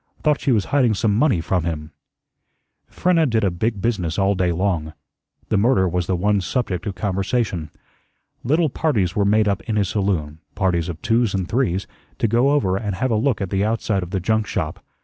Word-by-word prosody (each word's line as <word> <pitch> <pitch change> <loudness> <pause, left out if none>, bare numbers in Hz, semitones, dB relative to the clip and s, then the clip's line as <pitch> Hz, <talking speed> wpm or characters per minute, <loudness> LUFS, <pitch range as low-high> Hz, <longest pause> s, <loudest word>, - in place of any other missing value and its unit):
Thought 150 -2 +2
she 140 - +1
was 105 -5 +2
hiding 125 -6 +3
some 105 +1 +1
money 110 - +2
from 90 +1 0
him." 80 -2 -4 1.0
Frenna 170 -3 +2
did 110 -1 +1
a 95 - +2
big 100 +4 -2
business 90 -9 -1
all 100 0 +3
day 90 -2 +1
long. 85 -3 -1 0.6
The 105 - +2
murder 110 -4 +3
was 90 0 -1
the 95 - +1
one 100 +3 +1
subject 95 -4 -2
of 100 - -3
conversation. 95 -2 -1 0.7
Little 155 +3 +2
parties 105 - 0
were 100 - +2
made 105 +1 +3
up 100 -1 0
in 110 - 0
his 100 -4 +1
saloon 85 -7 -1 0.2
parties 90 -2 0
of 80 -3 -7
twos 115 -3 +2
and 95 -2 -2
threes 100 -4 0 0.3
to - - +1
go 120 +5 +3
over 115 -11 +2
and 100 -2 -3
have 130 +5 -1
a - - +2
look 115 0 +1
at 95 - -3
the 95 0 +1
outside 110 -2 0
of 90 - -6
the 95 0 -1
junk 110 +3 0
shop. 80 +5 -3
100 Hz, 205 wpm, -21 LUFS, 90-115 Hz, 1.0 s, hiding